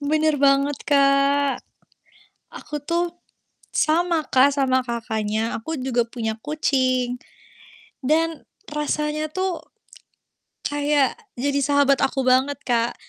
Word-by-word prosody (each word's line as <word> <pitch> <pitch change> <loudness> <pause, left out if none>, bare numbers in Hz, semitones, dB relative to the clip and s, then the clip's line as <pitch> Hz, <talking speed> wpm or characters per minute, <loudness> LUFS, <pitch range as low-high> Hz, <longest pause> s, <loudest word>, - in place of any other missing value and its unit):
Benar 305 +1 +1
banget, 275 0 +3
Kak. 280 0 +3 0.9
Aku 295 -1 -7
tuh, 340 +3 -2 0.5
sama 330 0 +1
Kak 265 +1 +4
sama 265 -2 +1
Kakaknya. 225 -2 -2
Aku 320 +7 -4
juga 255 -2 0
punya 225 -2 -3
kucing. 255 -4 0 0.8
Dan, 320 +3 0 0.2
rasanya 300 +1 -1
tuh, 370 +3 -2 1.0
kayak 290 - +1 0.2
jadi 280 +3 -1
sahabat 285 -1 +3
aku 270 0 -2
banget, 260 +2 +2
Kak. 235 -1 0
280 Hz, 100 wpm, -22 LUFS, 255-300 Hz, 1.0 s, Kak